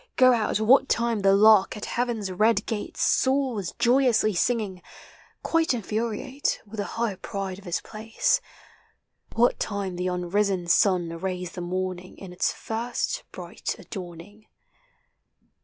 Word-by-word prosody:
Go 255 -1 +6
out 215 -3 0
what 255 +5 +4
time 235 -1 +1
the 195 0 +4
lark 215 0 +5
at 210 - -5
heaven's 235 -5 -2
red 215 +5 +2
gate 215 -2 -5
Soars 260 -8 +1
joyously 245 -4 +3
singing 200 -1 -1 0.3
— - - -28
quite 325 -5 +2
infuriate 235 +5 -2
With 215 +1 -11
the 205 - -1
high 230 -5 -1
pride 195 -1 -5
of 200 - -17
his 175 - -2
place; 225 - -1 0.9
What 240 +2 +3
time 200 -4 -3
the 180 +1 -2
unrisen 180 +1 0
sun 175 -1 +3
arrays 180 +1 -4
the 180 - -7
morning 185 +1 -4
In 185 -2 -10
its 180 - 0
first 240 - -3
bright - - -5
adorning. 190 +2 -10
210 Hz, 140 wpm, -25 LUFS, 185-235 Hz, 0.9 s, Go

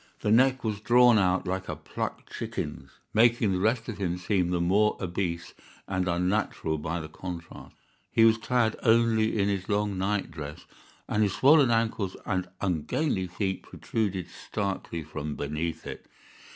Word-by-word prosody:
The 105 - +1
neck 130 +3 +4
was 105 -3 -2
drawn 120 0 +6
out 95 -1 +2
like 95 +1 -3
a - - -2
plucked - - -6
chicken's, 75 - -5 0.2
making 115 -1 +4
the 90 - 0
rest 110 +4 +1
of 110 -4 -6
him 90 -2 -1
seem 90 -1 0
the 90 -1 0
more 100 +5 +3
obese 85 -2 -3 0.3
and 95 -1 -1
unnatural 90 -3 0
by 85 +3 -3
the 80 - -6
contrast. 85 +1 -8 0.4
He 115 - +5
was 115 0 +5
clad 115 -2 +1
only 110 -1 +3
in 100 -1 +2
his 100 -2 -2
long 105 -2 0
night 95 -1 -1
dress, 75 -2 -8 0.4
and 105 - 0
his 100 -3 +2
swollen 140 -1 +6
ankles 115 -4 0
and 95 -2 -1
ungainly 95 - 0
feet 95 +1 -2
protruded 100 -5 -3
starkly 95 -3 -4
from 75 -1 -5
beneath 80 +3 -3
it. - - -7
95 Hz, 160 wpm, -28 LUFS, 90-110 Hz, 0.4 s, drawn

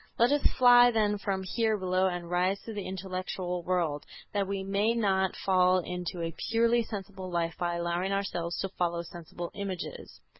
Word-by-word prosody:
Let 240 +3 +4
us 290 0 +3 0.2
fly 245 -1 +8
then 210 -3 +1
from 195 -1 -2
here 220 +3 0
below 185 0 +1
and 175 -2 -3
rise 180 +3 +1
to 225 - -7
the 205 -2 -5
intellectual 185 -1 -4
world, 170 -5 -1 0.3
that 200 -2 0
we 195 0 -2
may 200 +4 +1
not 190 -4 +1
fall 185 -1 +3
into 180 -1 -4
a 165 0 -3 0.2
purely 230 +1 +3
sensible 195 -3 -7
life 170 -1 -1
by 175 -1 0
allowing 170 +2 -1
ourselves 175 -4 -2
to 195 - -2
follow 170 -2 -1
sensible 170 0 -8
images...." 195 -3 -6
190 Hz, 175 wpm, -29 LUFS, 175-205 Hz, 0.3 s, fly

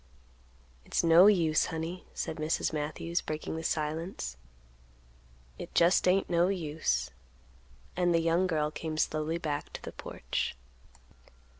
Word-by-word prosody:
"It's - - -1
no 170 +3 +8
use, 165 -7 +3
honey," 165 +3 -5
said 155 - -3
Mrs. 155 +1 -1
Matthews, 155 +3 -2
breaking 155 +1 -4
the 160 - -5
silence; 155 - -2 1.2
"it - - -8
just 175 +2 +4
ain't 190 +2 +3
no 175 0 +3
use;" 155 - -1 0.8
and 175 -1 +2
the 170 - +4
young 165 +3 +2
girl 155 -3 0
came 155 0 -5
slowly 155 +1 0
back 150 -4 -3
to - - -7
the - - -6
porch. - - -4
160 Hz, 130 wpm, -30 LUFS, 155-175 Hz, 1.2 s, no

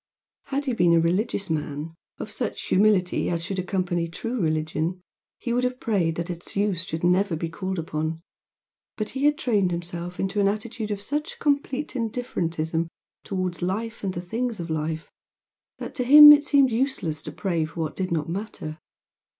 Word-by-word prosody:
Had 280 +1 -2
he 260 - 0
been 175 -6 +4
a 165 - +6
religious 190 +4 0
man, 150 0 -3 0.2
of 215 - -6
such 235 +1 -3
humility 190 -2 +2
as 170 -1 -1
should 195 +1 -3
accompany 180 -2 -1
true 230 +8 -4
religion, 155 +2 -1 0.4
he 235 - -3
would 250 +1 +1
have 250 0 -1
prayed 180 -7 +1
that 170 +2 -3
its 175 0 -8
use 200 -4 +1
should 165 -2 -5
never 180 +1 +3
be 165 +1 -3
called 185 +3 -4
upon, 160 0 -2 0.8
but 215 -1 -2
he 270 +2 -2
had 295 0 +4
trained 210 - +2
himself 175 0 -5
into 195 +2 0
an 195 - +4
attitude 215 +2 -3
of 205 -1 -2
such 295 +7 -3
complete 285 -1 0
indifferentism 170 -9 -2 0.4
towards 185 -4 -3
life 215 +6 -3
and 190 -2 -2
the 175 - -3
things 225 +5 -3
of 165 -1 -4
life, 160 +1 -3 0.7
that - - -7
to 250 - -1
him 295 +4 +11
it 295 0 +7
seemed 280 -3 +4
useless 225 - -1
to - - -6
pray 175 -5 -1
for 165 +2 -5
what 155 -1 -3
did 185 -2 -2
not 155 -3 0
matter. 170 -4 -5
185 Hz, 180 wpm, -25 LUFS, 165-230 Hz, 0.8 s, him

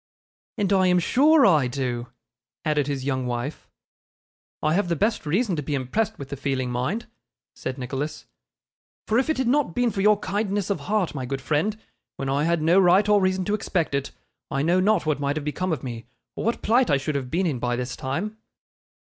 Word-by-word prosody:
'And 200 -1 +1
I 190 -1 +4
am 180 0 +4
sure 285 - +5
I 155 -9 +4
do,' 125 -2 -3 0.6
added 150 -2 +1
his 135 -2 -3
young 130 -2 -1
wife. 120 +5 -4 0.9
'I 155 0 +2
have 185 0 +1
the 170 - +1
best 210 -2 0
reason 190 +4 +1
to - - -1
be 145 +1 -2
impressed 135 - -1
with 140 -1 -8
the - - -4
feeling, 130 -2 -2
mind,' 130 - -2 0.5
said 130 +1 -5
Nicholas; 135 +4 -4 0.8
'for 220 +3 +3
if 265 - 0
it 315 - +1
had 260 -2 0
not 265 - +1
been 245 -1 +2
for 195 - -2
your 210 +1 +5
kindness 200 0 -1
of 200 - -1
heart, 205 -3 -1
my 130 -3 -4
good 135 +1 -3
friend, 160 +10 0 0.4
when 135 - -4
I 140 +3 +1
had 170 -1 +1
no 170 +4 +5
right 190 +2 +5
or 210 -1 +4
reason 185 0 +1
to 205 - -1
expect 180 -7 -1
it, 140 0 -1 0.4
I 135 +1 -1
know 175 +4 +3
not 200 -1 +2
what 155 -2 0
might 140 0 -1
have 155 -2 -4
become 180 +5 -2
of 155 -6 -2
me 120 -2 -6 0.3
or - - -4
what 230 - -1
plight 245 +4 +3
I 140 - +4
should 140 +3 -3
have 135 -3 -3
been 180 +6 0
in 145 -8 -1
by 120 0 0
this 125 +1 -4
time. 175 +12 -3
160 Hz, 215 wpm, -24 LUFS, 135-205 Hz, 0.9 s, sure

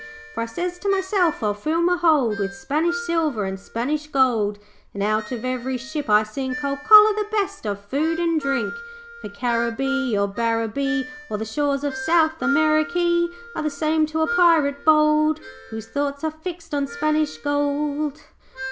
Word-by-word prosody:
'For - - -3
I - - -1
sez 350 +10 -4
to 400 - -2
meself, 380 - +1
"I'll 210 -1 +1
fill 310 +11 -1
me 355 +1 +3
hold 300 -11 +2
With 195 -1 -3
Spanish 305 - -1
silver 315 - 0
and 190 0 -4
Spanish 285 +9 -3
gold, 240 -8 +1 0.4
And 200 - -2
out 215 +1 -1
of 245 -1 -4
every 255 0 -2
ship 280 +2 -6
I 210 +1 +5
sink 260 +6 -4
I'll 280 0 -1
collar 425 +6 +8
the 420 0 -2
best 400 - -2
of 200 0 -4
food 315 +8 -1
and 335 -2 +1
drink. 280 - -1 0.5
'"For - - -7
Caribbee, 235 +3 -1
or 200 0 +1
Barbaree, 230 +7 -1 0.2
Or 210 - -2
the 220 - -4
shores 280 +4 -1
of 285 -2 -2
South 315 +4 +1
Amerikee 155 - +2 0.3
Are - - -7
all - - -1
the 305 - 0
same 310 +2 0
to 315 +1 -1
a 350 +2 0
Pirate 320 -5 +3
bold, 305 0 +4 0.3
Whose 220 -1 -7
thoughts 280 +4 -3
are 315 - 0
fixed 330 +1 -8
on 285 -1 0
Spanish 305 +1 -1
gold." 290 0 -1
285 Hz, 175 wpm, -22 LUFS, 230-320 Hz, 0.5 s, collar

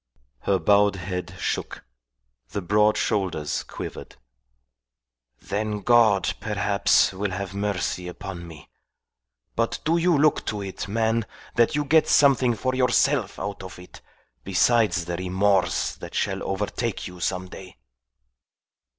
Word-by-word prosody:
Her 95 +9 +1
bowed 100 +3 +3
head 90 -1 -5
shook. - - -4 0.6
The 100 - -4
broad 105 +3 +3
shoulders 90 -9 -1
quivered. - - -8 1.2
"Then 105 - -3
God, 110 -3 +4
perhaps, 105 -2 +2
will 100 +2 -2
have 95 0 -5
mercy 100 -3 -2
upon 90 -1 -7
me! 80 -3 -12 0.9
But 115 0 0
do 165 +2 +3
you 170 -1 +3
look 150 +1 +3
to 105 -2 -2
it, 95 0 -6
man, 115 +1 0 0.3
that 115 +5 +2
you 150 0 0
get 160 +2 +4
something 130 -4 +4
for 130 +4 -1
yourself 130 -2 +2
out 100 -1 -5
of 95 -1 -9
it, 90 0 -13 0.4
besides 95 -2 +2
the 85 0 -3
remorse 95 0 +1
that - - -9
shall - - -1
overtake 105 +3 -3
you 90 -1 -9
some 95 +1 -2
day." 90 -3 -12
100 Hz, 130 wpm, -24 LUFS, 95-115 Hz, 1.2 s, God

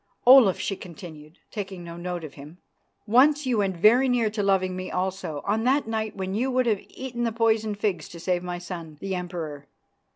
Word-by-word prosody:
"Olaf," 245 -7 +8
she 195 - -2
continued, 165 -4 -11
taking 195 -4 -6
no 170 0 -8
note 175 0 -5
of 155 - -8
him, 150 +4 -12 0.5
"once 280 +6 +4
you 245 -4 +1
went 190 -3 0
very 240 +8 +5
near 235 -4 +2
to 210 -1 -2
loving 190 -2 +1
me 185 0 -5
also, 185 -5 -3
on 215 +2 0
that 270 0 +2
night 220 -1 -2
when 190 -1 -4
you 245 +6 0
would 255 -1 +1
have 215 -4 +1
eaten 245 -2 -5
the 230 - 0
poisoned 220 -2 +1
figs 205 -3 -2
to 170 - -10
save 180 +1 0
my 180 0 -4
son, 170 -3 -8
the 195 +2 -4
Emperor. 165 -6 -5
195 Hz, 200 wpm, -25 LUFS, 175-225 Hz, 0.5 s, Olaf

